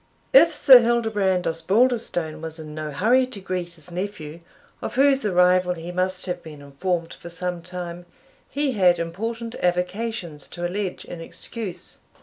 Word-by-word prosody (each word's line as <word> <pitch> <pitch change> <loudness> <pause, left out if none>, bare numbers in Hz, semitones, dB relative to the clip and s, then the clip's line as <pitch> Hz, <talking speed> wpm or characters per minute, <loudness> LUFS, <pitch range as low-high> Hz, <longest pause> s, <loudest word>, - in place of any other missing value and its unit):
If 335 -9 +8
Sir 270 -4 +8
Hildebrand 220 -6 +1
Osbaldistone 175 -2 +1
was 160 0 -6
in 155 -1 -8
no 155 0 -5
hurry 235 - +3
to 255 -6 -8
greet 180 -2 -4
his 170 +1 -14
nephew, 175 -4 -5 0.4
of - - -5
whose 270 -2 +4
arrival 180 -1 +3
he 170 +1 -7
must 185 +1 -1
have 180 - -3
been 155 -2 -11
informed 165 +4 -3
for 170 - -11
some 175 0 -4
time, 175 0 -7 0.4
he 285 0 0
had 185 -6 +4
important 225 +8 -4
avocations 180 -2 -2
to 175 0 -5
allege 185 +1 -3
in 175 - -8
excuse. 195 +2 -7
180 Hz, 150 wpm, -23 LUFS, 170-220 Hz, 0.4 s, If